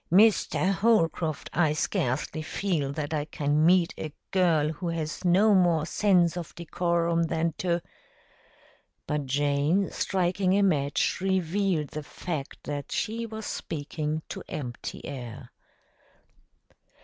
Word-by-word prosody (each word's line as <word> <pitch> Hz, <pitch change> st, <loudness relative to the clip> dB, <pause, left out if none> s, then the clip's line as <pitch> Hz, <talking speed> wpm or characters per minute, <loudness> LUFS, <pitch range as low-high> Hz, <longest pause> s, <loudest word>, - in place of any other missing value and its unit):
"Mr. 195 Hz, -1 st, +4 dB
Holcroft, 180 Hz, -7 st, +1 dB
I 160 Hz, -3 st, +3 dB
scarcely 145 Hz, +1 st, -1 dB
feel 155 Hz, -4 st, -1 dB
that 150 Hz, +1 st, -3 dB
I 150 Hz, -1 st, -1 dB
can 150 Hz, 0 st, 0 dB
meet 175 Hz, 0 st, +4 dB
a 155 Hz, -, -4 dB, 0.2 s
girl 165 Hz, -5 st, +3 dB
who 160 Hz, +3 st, -4 dB
has 160 Hz, -2 st, -3 dB
no 195 Hz, +5 st, +5 dB
more 175 Hz, -5 st, +3 dB
sense 180 Hz, -2 st, +3 dB
of 175 Hz, -3 st, -6 dB
decorum 170 Hz, 0 st, 0 dB
than 165 Hz, 0 st, 0 dB
to 175 Hz, -2 st, 0 dB, 0.6 s
" -, -, -32 dB
But 150 Hz, -2 st, -2 dB
Jane, 145 Hz, +7 st, +1 dB
striking 185 Hz, +1 st, +1 dB
a 200 Hz, -, +4 dB
match, 145 Hz, -3 st, +1 dB
revealed 190 Hz, -3 st, 0 dB
the 155 Hz, -, -5 dB
fact 150 Hz, -1 st, -6 dB
that 145 Hz, -1 st, -5 dB
she 230 Hz, +2 st, -2 dB
was 220 Hz, -1 st, -7 dB
speaking 155 Hz, 0 st, -3 dB
to -, -, -5 dB
empty 125 Hz, -5 st, -6 dB
air. 125 Hz, -5 st, -7 dB
165 Hz, 125 wpm, -27 LUFS, 150-185 Hz, 0.6 s, no